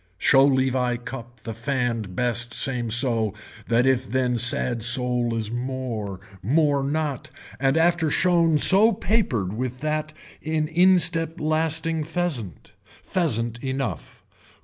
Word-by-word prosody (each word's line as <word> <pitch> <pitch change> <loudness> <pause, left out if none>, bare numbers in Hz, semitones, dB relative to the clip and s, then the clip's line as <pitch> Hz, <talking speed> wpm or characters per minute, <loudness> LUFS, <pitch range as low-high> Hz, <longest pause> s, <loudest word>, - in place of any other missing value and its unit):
Show 135 +7 +4
leave 130 -2 +1
I 125 -1 -1
cup 120 0 -10
the 115 - -7
fanned 115 -5 -3
best 120 0 0
same 125 -4 0
so 115 -3 +1 0.3
that 120 +1 +2
if 130 -2 +1
then 125 -1 -1
sad 120 0 +4
sole 120 0 +1
is 110 -1 -4
more, 120 -6 -5 0.2
more 145 - +1
not, 145 -1 -3 0.3
and 135 +3 +1
after 165 -1 +2
shown 170 -2 +2
so 205 +8 +6
papered 160 - -1
with 125 +2 -5
that 155 0 -3 0.3
in 155 0 -2
instep 170 -1 +3
lasting 160 +1 -1
pheasant. 155 - -4
Pheasant 120 - -3
enough. 130 - -5
130 Hz, 125 wpm, -23 LUFS, 120-155 Hz, 0.3 s, so